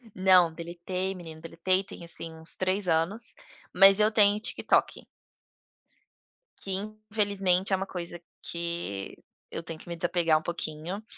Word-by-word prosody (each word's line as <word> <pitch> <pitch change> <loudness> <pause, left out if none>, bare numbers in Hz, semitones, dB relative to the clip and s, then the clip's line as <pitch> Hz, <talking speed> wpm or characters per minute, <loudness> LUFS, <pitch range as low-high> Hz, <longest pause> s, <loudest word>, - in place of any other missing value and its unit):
Não, 185 -3 +5
deletei 175 +3 -4
menino, 160 -3 -10
deletei 185 +3 0
tem 180 - -11
assim 165 -1 -1
uns 160 0 -1
3 185 +1 -1
anos, 170 +8 0 0.4
mas 195 +2 +8
eu 215 +1 +4
tenho 210 -1 +4
TikTok. 225 - 0 1.5
Que 195 - -7 0.4
infelizmente 195 -3 +1
é - - +6
uma 190 +1 -3
coisa 175 -1 -6 0.2
que 170 -13 -4 0.4
eu 165 - -5
tenho 165 -1 -8
que - - -15
me 170 - -5
desapegar 170 -2 +1
um - - -4
pouquinho, 170 +4 -5
175 Hz, 140 wpm, -27 LUFS, 165-195 Hz, 1.5 s, mas